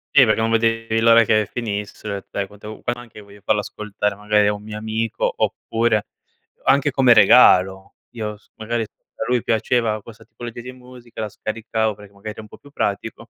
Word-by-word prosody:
Sì, 135 Hz, -, +8 dB
perché 110 Hz, -1 st, +2 dB
non 115 Hz, -, +1 dB
vedevi 115 Hz, 0 st, +1 dB
l'ora 115 Hz, 0 st, +6 dB
che 110 Hz, -2 st, +2 dB
finisse. 105 Hz, -3 st, -4 dB
Sai 100 Hz, -1 st, -2 dB
quante 105 Hz, +1 st, -13 dB
u 110 Hz, -, -9 dB
anche 120 Hz, -2 st, -5 dB
io 105 Hz, -, -12 dB
voglio 100 Hz, 0 st, -16 dB
farla 105 Hz, -1 st, +1 dB
ascoltare 105 Hz, 0 st, -3 dB
magari 105 Hz, 0 st, +2 dB
a 105 Hz, -, +2 dB
un 105 Hz, -, -8 dB
mio 105 Hz, 0 st, -7 dB
amico, 110 Hz, +1 st, -2 dB
oppure, 115 Hz, -2 st, 0 dB, 0.6 s
anche 140 Hz, +1 st, +3 dB
come 130 Hz, -2 st, +5 dB
regalo 95 Hz, -5 st, +5 dB, 0.2 s
io 105 Hz, -2 st, -5 dB
s -, -, -30 dB
magari 115 Hz, +1 st, -2 dB
a 110 Hz, -, -9 dB
lui 125 Hz, -2 st, +1 dB
piaceva 110 Hz, -1 st, 0 dB
questa 115 Hz, +1 st, -14 dB
tipologia 120 Hz, +1 st, -9 dB
di 125 Hz, -, -8 dB
musica 125 Hz, -2 st, -11 dB
la 110 Hz, -, -3 dB
scaricavo, 110 Hz, +1 st, -2 dB
perché 105 Hz, 0 st, -15 dB
magari 100 Hz, +2 st, -7 dB
ero 110 Hz, -, -9 dB
un 110 Hz, -, -13 dB
po' -, -, -14 dB
più 145 Hz, -, -18 dB
pratico, 115 Hz, -1 st, -3 dB
110 Hz, 195 wpm, -21 LUFS, 105-115 Hz, 0.6 s, Sì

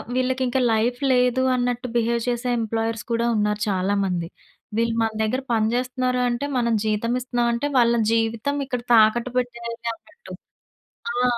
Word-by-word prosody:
వీళ్ళకింక 255 Hz, 0 st, 0 dB
life 240 Hz, +3 st, 0 dB
లేదు 250 Hz, +1 st, +2 dB
అన్నట్టు 245 Hz, 0 st, -1 dB
behave 235 Hz, 0 st, +1 dB
చేసే 245 Hz, +1 st, -2 dB
ఎంప్లాయర్స్ 225 Hz, 0 st, -2 dB
కూడా 230 Hz, +1 st, +1 dB
ఉన్నారు 210 Hz, 0 st, 0 dB
చాలామంది. 190 Hz, -3 st, 0 dB, 0.5 s
వీళ్ళు 230 Hz, 0 st, +1 dB
మన 225 Hz, -, 0 dB
దగ్గర 250 Hz, +5 st, -1 dB
పని 220 Hz, -1 st, +2 dB
చేస్తున్నారు, 250 Hz, 0 st, -1 dB
అంటే 240 Hz, +4 st, -2 dB
మనం 235 Hz, -1 st, +1 dB
జీతమిస్తున్నాం 240 Hz, +3 st, 0 dB
అంటే, 235 Hz, +5 st, -1 dB
వాళ్ళ 235 Hz, -1 st, +4 dB, 0.2 s
జీవితం 230 Hz, +4 st, 0 dB
ఇక్కడ 250 Hz, -2 st, -3 dB
తాకట్టు 230 Hz, +2 st, +4 dB
పెట్టేది 235 Hz, -2 st, -3 dB, 0.2 s
అన్నట్టు. 465 Hz, -, -15 dB, 0.8 s
ఆ! 245 Hz, +1 st, 0 dB
235 Hz, 135 wpm, -23 LUFS, 225-250 Hz, 0.8 s, వాళ్ళ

